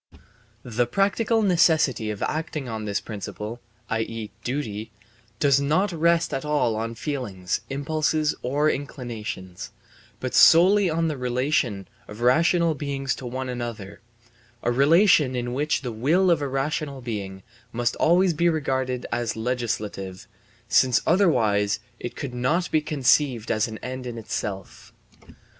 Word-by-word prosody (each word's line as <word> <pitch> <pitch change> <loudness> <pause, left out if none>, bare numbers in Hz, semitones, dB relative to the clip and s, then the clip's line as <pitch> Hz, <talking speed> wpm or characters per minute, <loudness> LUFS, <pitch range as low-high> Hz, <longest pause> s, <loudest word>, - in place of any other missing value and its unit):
The 120 0 -1
practical 205 - +1
necessity 160 - +3
of 105 -1 -4
acting 155 -3 -3
on 110 -2 -4
this 100 -1 -1
principle, 105 +2 -7 0.3
i.e., 115 -2 -3
duty, 110 -5 -4 0.5
does 140 -1 +4
not 160 +8 +1
rest 170 0 +2
at 135 - -2
all 150 -7 +1
on 115 +1 -3
feelings, 115 - -3
impulses, 155 +2 0
or 145 +4 +1
inclinations, 110 -9 -5 0.5
but - - -4
solely 190 +3 +6
on 165 +1 0
the 155 -3 -2
relation 125 -5 -1 0.2
of 105 +2 -10
rational 165 +6 +3
beings 135 -2 -2
to 125 - -7
one 130 +2 -4
another, 120 -5 -6 0.6
a 120 - +1
relation 145 +1 +4
in 120 0 -3
which 145 +2 0
the 125 - -3
will 160 +12 +2
of 165 -3 +2
a 140 - -1
rational 140 +1 -2
being 100 -5 -5 0.3
must 120 0 -1
always 175 +2 +4
be 170 +3 +2
regarded 130 -5 -1
as 120 -1 -1
legislative, 110 -5 -3 0.4
since 130 -2 +4
otherwise 110 - +2 0.2
it 120 - -6
could 135 -3 -5
not 140 +9 0
be 155 - +3
conceived 135 -5 +1
as 110 -1 +1
an 110 -1 -7
end 130 0 -5
in 120 -1 -6
itself. 100 -3 -6
130 Hz, 140 wpm, -24 LUFS, 115-155 Hz, 0.6 s, solely